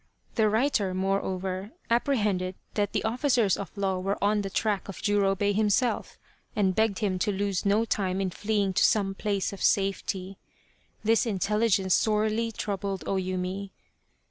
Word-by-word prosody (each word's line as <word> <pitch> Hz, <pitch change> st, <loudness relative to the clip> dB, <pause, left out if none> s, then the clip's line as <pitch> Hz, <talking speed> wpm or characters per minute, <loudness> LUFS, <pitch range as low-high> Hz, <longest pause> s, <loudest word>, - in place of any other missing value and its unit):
The 220 Hz, -2 st, +3 dB
writer, 215 Hz, -4 st, +1 dB
moreover, 190 Hz, +1 st, -2 dB, 0.2 s
appre 240 Hz, +4 st, +3 dB
hended 185 Hz, -4 st, 0 dB, 0.2 s
that 205 Hz, -1 st, 0 dB
the -, -, -1 dB
officers 235 Hz, -3 st, +2 dB
of 200 Hz, +1 st, -8 dB
law 190 Hz, -2 st, 0 dB
were 195 Hz, +2 st, -1 dB
on 205 Hz, +1 st, +2 dB
the 195 Hz, -, -4 dB
track 205 Hz, 0 st, -1 dB
of 195 Hz, -, -7 dB
Jurobei 205 Hz, -1 st, +2 dB
himself, 215 Hz, +4 st, +1 dB, 0.4 s
and 195 Hz, -3 st, +2 dB
begged 220 Hz, -1 st, +1 dB
him 195 Hz, -4 st, -1 dB
to 205 Hz, -, +1 dB
lose 200 Hz, 0 st, -1 dB
no 210 Hz, +3 st, +3 dB
time 195 Hz, -3 st, -1 dB
in 190 Hz, -2 st, -1 dB
fleeing 205 Hz, -1 st, 0 dB
to -, -, +3 dB
some 195 Hz, -3 st, +3 dB
place 200 Hz, -1 st, -1 dB
of 200 Hz, -, -9 dB
safety. 195 Hz, -1 st, 0 dB, 0.6 s
This 225 Hz, +2 st, +3 dB
intelligence 205 Hz, -1 st, +1 dB
sorely 220 Hz, +1 st, +1 dB
troubled 200 Hz, -2 st, -3 dB
O -, -, -1 dB
Yumi. 185 Hz, +1 st, -3 dB
200 Hz, 155 wpm, -27 LUFS, 190-215 Hz, 0.6 s, The